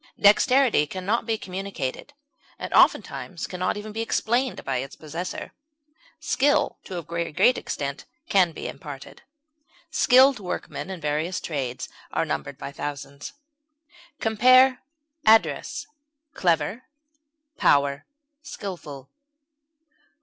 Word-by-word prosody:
Dexterity 225 - +5
can 185 +3 -6
not 225 +3 0
be 225 -1 +1
communicated, 190 - -5 0.4
and, - - -6
oftentimes 175 -5 +2
can 180 - -7
not 185 +3 0
even 210 +1 -7
be 220 +2 -3
explained 240 +3 0
by 135 -1 -1
its 135 +2 -5
possessor; 165 +4 -6 0.7
skill 290 +2 +1
to 185 - -6
a 170 - -4
very 170 +1 -3
great 195 +10 +4
extent 140 0 -4 0.2
can 185 -4 +4
be - - -6
imparted; 140 -4 -9 0.7
"skilled 260 0 +5
workmen" 185 0 -5
in 190 -2 -5
various 155 +4 -1
trades 135 -6 -4 0.2
are - - 0
numbered - - -4
by - - -7
thousands. 140 - -6 0.9
Compare 255 +4 +5 0.5
ADDRESS; 220 +1 +3 0.5
CLEVER; 175 +5 +1 0.8
POWER; 140 0 +2 0.3
SKILFUL. 170 - -8
185 Hz, 115 wpm, -25 LUFS, 150-225 Hz, 0.9 s, Dexterity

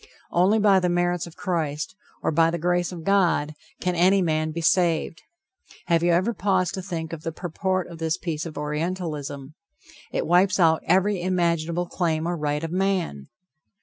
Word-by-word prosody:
Only 185 +5 +3
by 200 -3 +5
the 180 -1 0
merits 175 -1 0
of 170 - -13
Christ, 155 -3 -2 0.3
or - - +1
by 165 +1 +4
the 170 - -2
grace 175 +1 0
of 170 -3 -8
God, 175 -6 +2 0.3
can 180 - -1
any 185 +3 +4
man 155 -3 0
be 160 +2 -4
saved. 170 -1 +1 0.6
Have 170 -2 +2
you 175 - +2
ever 185 +7 +2
paused 185 -4 0
to 190 - -4
think 170 -3 -5
of 160 - -6
the 165 - -4
purport 185 +2 -2
of 170 -2 -10
this 160 +1 0
piece 165 -2 -4
of 155 - -9
Orientalism? 150 -2 -4 0.6
It - - -1
wipes 185 +3 +3
out 160 -2 +4
every 190 +2 +2
imaginable 170 -1 0
claim 165 -2 -1
or 175 - -1
right 150 -1 -2
of 165 - -3
man. 180 - -1
170 Hz, 180 wpm, -24 LUFS, 160-185 Hz, 0.6 s, by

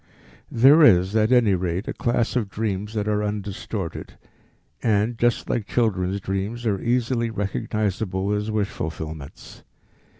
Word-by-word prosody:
There 135 +7 +6
is 95 - +5
at 110 +1 +3
any 120 -5 +4
rate 90 +2 -2
a - - -2
class 120 0 0
of 115 -6 0
dreams 105 0 -3
that 105 -1 -1
are 105 0 +1
undistorted, 100 -3 -5 0.6
and, 110 +1 +1
just 120 0 0
like 110 -4 -2
children's 100 -5 0
dreams, 100 +5 -4
are 100 -4 0
easily 120 -1 0
recognizable 100 -1 -2
as 105 +1 -2
wish 105 -2 0
fulfillments. 80 -2 -7
105 Hz, 135 wpm, -23 LUFS, 95-115 Hz, 0.6 s, There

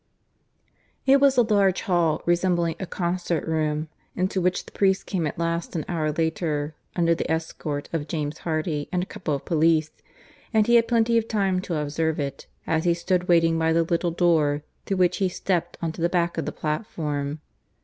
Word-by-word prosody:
(III) 265 - +7
It 275 - +5
was 275 -2 +5
a 245 - +6
large 200 -4 +2
hall, 170 -4 +1
resembling 175 -1 +1
a 190 - -4
concert 175 -2 -2
room, 155 -1 0 0.3
into 185 +1 0
which 180 +1 0
the - - -13
priest 190 -1 +1
came 175 -6 -1
at - - -5
last, 170 +1 -2
an 160 - -2
hour 155 -3 -1
later, 155 -1 -1 0.2
under 170 -1 +3
the - - -3
escort 160 -2 -3
of 155 -2 -2
James 150 -1 -3
Hardy 155 -2 -2
and 180 -1 0
a - - -4
couple 155 -6 -3
of 140 - -7
police, 160 -1 +2 0.6
and 220 -2 +4
he 235 - +2
had 230 -1 +5
plenty 230 -1 +3
of 225 - -5
time 195 -4 +1
to 180 -3 -3
observe 155 +2 -1
it, 140 -2 -4 0.2
as 160 +1 0
he 170 -1 +3
stood 180 +1 0
waiting 165 -1 +4
by 160 0 +2
the 165 0 +3
little 170 +1 0
door 160 -4 +2 0.2
through 195 - 0
which 180 -1 +3
he 190 -2 +1
stepped 175 -1 -2
on 165 - 0
to 165 - -9
the 170 - +2
back 170 -1 0
of - - -3
the - - -1
platform. 150 -3 -3
170 Hz, 200 wpm, -25 LUFS, 155-185 Hz, 0.6 s, III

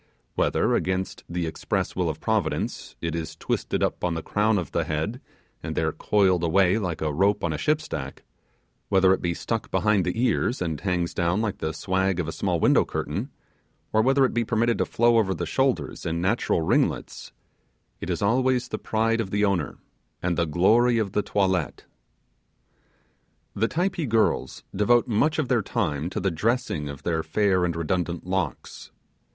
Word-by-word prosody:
Whether - - +1
against 95 +2 -1
the 85 0 -2
express 80 - -2
will - - 0
of - - -4
Providence, - - -2
it 85 -1 -2
is 85 -1 -4
twisted - - -2
upon 90 -2 -1
the 80 - -4
crown 105 +1 +1
of 90 - -3
the - - 0
head 80 - -3 0.4
and - - -5
there - - +1
coiled 95 -4 +2
away 95 +4 +3
like 85 -6 -3
a 75 -1 -1
rope 100 +6 +2
on 85 - 0
a - - -3
ship's 155 - 0
deck; 70 -1 -6 0.7
whether 95 -1 +5
it - - -2
be 85 -1 -1
stuck 115 +4 -3
behind 105 -3 +2
the 90 +6 -2
ears 125 0 +1
and 80 -4 -3
hangs 90 -3 -1
down 85 +3 +1
like 110 -3 -2
the 80 - -2
swag 95 +3 0
of 85 - -1
a - - -2
small - - -1
window - - +4
curtain; 100 - -4 0.6
or 110 - +4
whether 135 +3 +4
it - - -1
be 120 - +1
permitted 115 +1 +1
to - - +2
flow 120 0 +3
over 95 -3 +1
the - - -3
shoulders 130 - 0
in 80 +1 -2
natural 90 -2 +1
ringlets, - - 0 0.7
it - - -6
is 90 +3 -1
always 125 +3 +2
the - - -4
pride 115 +1 +1
of 100 - -4
the 105 +1 +1
owner, 90 -7 -1 0.4
and 90 0 -1
the 85 0 +1
glory 115 +10 +4
of 105 -4 0
the 105 - +1
toilette. 95 -3 -1 1.7
The 110 +3 +1
Typee 175 +1 -1
girls 110 -1 +1
devote 115 +4 +3
much 135 +8 +1
of 155 -4 0
their 120 -3 +2
time 75 -4 -2
to 105 - -3
the 95 -1 0
dressing 95 - -1
of 70 0 -8
their 80 -2 0
fair 95 0 +1
and 85 -1 0
redundant 85 +1 -2
locks. 90 -7 -3
95 Hz, 180 wpm, -25 LUFS, 85-115 Hz, 1.7 s, whether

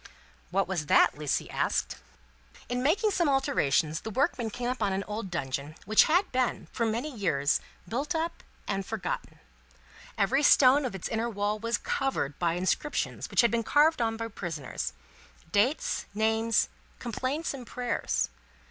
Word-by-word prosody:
"What 195 0 +1
was 175 -6 -2
that?" - - +5
Lucie 150 -1 -1
asked. - - 0 0.7
"In 245 0 -1
making 405 - +2
some 345 -5 +2
alterations, 165 - +2
the 220 - -5
workmen 240 -1 0
came 240 +3 -4
upon 225 -6 0
an 195 +1 -1
old 210 -1 -5
dungeon, 145 -2 -3
which 215 +2 +6
had 355 +5 +2
been, 255 -1 0
for 230 - 0
many 245 +6 -2
years, 155 -9 +1 0.3
built 275 - -2
up 330 +1 -2 0.3
and 195 - -1
forgotten. 195 -2 -4 0.8
Every 260 +8 +2
stone 280 -1 +6
of 240 - -3
its 190 - -4
inner 230 +1 -1
wall 205 0 -1
was 230 +2 0
covered 270 - -2
by 170 -2 +1
inscriptions 185 +11 -1
which - - +4
had 235 -3 +3
been 235 - +1
carved 295 +7 +4
by 225 -1 -1
prisoners 165 - -5 0.6
dates, 235 - +1
names, 220 +1 +2 0.3
complaints, 260 +7 -2
and 255 -4 -8
prayers. 220 - -1
225 Hz, 150 wpm, -29 LUFS, 190-265 Hz, 0.8 s, which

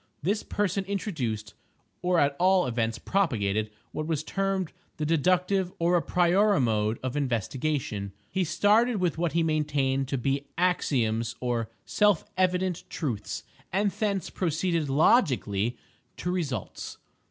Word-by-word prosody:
This 205 +6 +1
person 195 -1 -1
introduced, 130 - -3 0.5
or 180 0 +2
at 140 0 +2
all 185 0 +4
events 115 -2 -1
propagated 110 - 0 0.2
what 155 0 -4
was 155 -2 -1
termed 195 0 -1 0.2
the 155 - -1
deductive 180 +4 +2
or 170 +1 +2
a 175 - +3
priori 185 +5 +3
mode 110 -3 +1
of 130 0 -2
investigation. 125 -4 -1 0.2
He 190 - +1
started 205 +8 +3
with 175 -5 0
what 170 -2 0
he 170 0 +2
maintained 145 -4 +1
to 135 - -1
be 140 +3 -1
axioms 120 -10 +1
or 120 -3 -1 0.2
"self 205 -5 +3
evident 185 -1 +1
truths," 120 - -3 0.3
and 200 +2 +2
thence 200 -4 -1
proceeded 165 -2 0
"logically" 130 - +3 0.4
to 180 - -2
results. 145 - -4
160 Hz, 130 wpm, -27 LUFS, 125-185 Hz, 0.5 s, all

